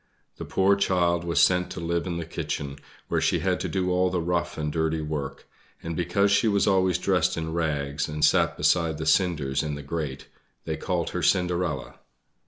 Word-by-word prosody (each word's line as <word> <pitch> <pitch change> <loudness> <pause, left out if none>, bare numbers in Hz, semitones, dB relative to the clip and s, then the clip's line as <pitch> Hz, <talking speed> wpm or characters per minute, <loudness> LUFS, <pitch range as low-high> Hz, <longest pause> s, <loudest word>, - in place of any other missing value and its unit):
The - - -6
poor 95 +1 +3
child 85 -3 +1
was 85 -4 0
sent 90 -1 +3
to - - -6
live 85 +1 -1
in 85 -1 -3
the 85 - -4
kitchen, 70 -3 -4 0.3
where - - 0
she - - +2
had - - 0
to - - -3
do 90 -1 0
all 90 +1 +2
the 90 -1 -1
rough 85 0 -1
and 75 -1 -2
dirty 80 0 0
work; 75 -3 -5 0.4
and 80 0 -4
because 90 +4 +1
she 100 +3 +3
was 100 -2 +2
always 95 -2 +3
dressed 90 -3 +1
in 80 0 -3
rags, 75 -3 -1
and 75 0 +2
sat - - +2
beside 85 -3 +2
the 80 - -4
cinders 75 -6 +2
in 75 -2 -3
the 70 - -7
grate, 70 -3 -4 0.4
they - - -2
called - - -2
her - - -3
Cinderella. 90 -5 0
85 Hz, 195 wpm, -26 LUFS, 75-90 Hz, 0.4 s, poor